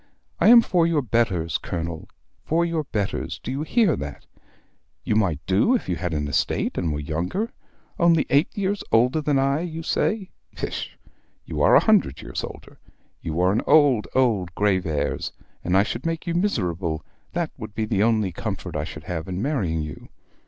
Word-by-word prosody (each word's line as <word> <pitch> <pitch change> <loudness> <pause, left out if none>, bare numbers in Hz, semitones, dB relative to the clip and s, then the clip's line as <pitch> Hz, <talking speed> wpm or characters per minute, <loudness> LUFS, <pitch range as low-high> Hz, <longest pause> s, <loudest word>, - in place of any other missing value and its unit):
I - - +4
am 235 +1 +9
for 170 -2 +2
your 155 -4 +1
betters, 105 -9 0
Colonel, 85 -1 -5 0.3
for 170 +2 +1
your 165 -3 -1
betters: 105 -6 -3
do 125 - -4
you 135 +2 -2
hear 180 - +2
that? - - -7 0.8
You 105 - 0
might 90 -9 0
do 100 - +3
if 240 - -2
you 90 - 0
had 90 +1 -3
an 75 -2 -1
estate 70 - 0
and 85 - -1
were 75 - -2
younger; 85 - -2 0.5
only 170 -2 +4
eight 145 +5 +4
years 200 0 -1
older 125 +7 +3
than 145 -2 +1
I, 135 +2 +2
you 165 -1 -5
say! 200 +4 -1 0.2
pish, - - -5 0.5
you - - -4
are - - +6
a - - +5
hundred 205 - +3
years - - -4
older. - - -10 0.4
You 80 +1 -3
are 90 +1 +4
an 105 - +1
old, 140 -8 +5
old 105 -9 +1
Graveairs, 95 -8 0 0.3
and 90 +2 +2
I 100 - +5
should 115 +4 -4
make 165 0 -3
you 170 - -1
miserable, 90 - -1 0.3
that 170 -2 -1
would 110 -2 -8
be 110 - -1
the 105 -2 0
only 110 -3 +2
comfort 80 - -5
I 75 0 -1
should 75 0 -9
have 80 -1 -4
in 90 0 -3
marrying 95 - -1
you. 75 -2 -9
110 Hz, 185 wpm, -24 LUFS, -, 0.8 s, am